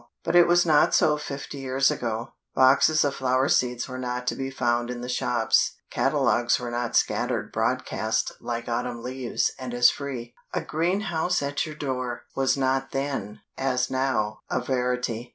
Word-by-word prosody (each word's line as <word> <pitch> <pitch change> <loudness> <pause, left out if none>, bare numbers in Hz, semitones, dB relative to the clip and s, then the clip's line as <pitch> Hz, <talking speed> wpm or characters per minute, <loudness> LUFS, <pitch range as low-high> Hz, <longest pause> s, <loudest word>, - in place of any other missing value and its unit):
But 165 - -1
it 175 -1 +7
was 175 0 +4
not 155 -3 +4
so 150 -1 +4
fifty 140 -1 -6
years 135 +1 +2
ago; 115 +1 -3 0.3
boxes 140 +4 +5
of 140 - 0
flower 130 0 +1
seeds 125 -2 +1
were 130 -1 -6
not 125 0 -3
to - - 0
be 135 0 -3
found 120 -2 0
in 125 -1 -5
the 125 - -5
shops; 120 -2 +1 0.2
catalogues 120 0 +2
were 120 -1 -5
not 120 -1 -2
scattered - - 0
broadcast - - -1
like 120 0 -4
autumn 120 0 -3
leaves 130 -1 -1
and 125 -2 -5
as 120 0 +6
free; 130 -4 -6 0.2
"a - - 0
greenhouse 175 0 0
at 145 +3 -1
your 155 - -7
door," 130 -4 -3
was 135 0 +2
not 135 0 0
then, 135 -7 -3 0.2
as 130 -1 0
now, 125 -5 0
a - - 0
verity. 125 -2 -2
130 Hz, 170 wpm, -25 LUFS, 120-140 Hz, 0.3 s, it